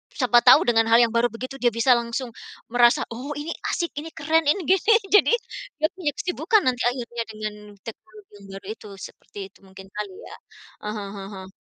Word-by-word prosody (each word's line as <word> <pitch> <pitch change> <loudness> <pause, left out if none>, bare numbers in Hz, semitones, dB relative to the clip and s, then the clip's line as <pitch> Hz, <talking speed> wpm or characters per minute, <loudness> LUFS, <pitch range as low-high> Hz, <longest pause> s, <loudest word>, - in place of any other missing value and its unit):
siapa 245 -2 +4
tahu 255 +4 +8
dengan 225 -1 +3
hal 230 +1 +6
yang 230 - +1
baru 235 +1 +2
begitu 255 +4 -8
dia 240 -1 +2
bisa 230 +3 +2
langsung 235 +1 -3 0.4
merasa, 240 0 +4
"Oh 255 +6 -6
ini 320 +3 -5 0.2
asik, 340 -2 -2
ini 320 - -7
keren, 320 0 +1
ini 360 +4 +2
gini." 380 +6 +3 0.2
Jadi, 415 - +5 0.4
dia 310 0 +1
punya 350 -7 -2
kesibukan 400 +4 +1
nanti 250 -2 0
akhirnya 240 -2 -3
dengan 215 -1 -5 0.3
teknologi 370 - -12
yang 200 - -15
baru 195 - -10
itu 215 - -14 0.2
seperti 205 - -14
itu - - -24
mungkin 190 0 -13
kali 205 -2 -5
ya? - - -10 0.5
Ah 210 - -3
hah 205 -1 -5 0.2
ah - - -8 0.2
hah. - - -11
245 Hz, 195 wpm, -24 LUFS, 225-310 Hz, 0.5 s, tahu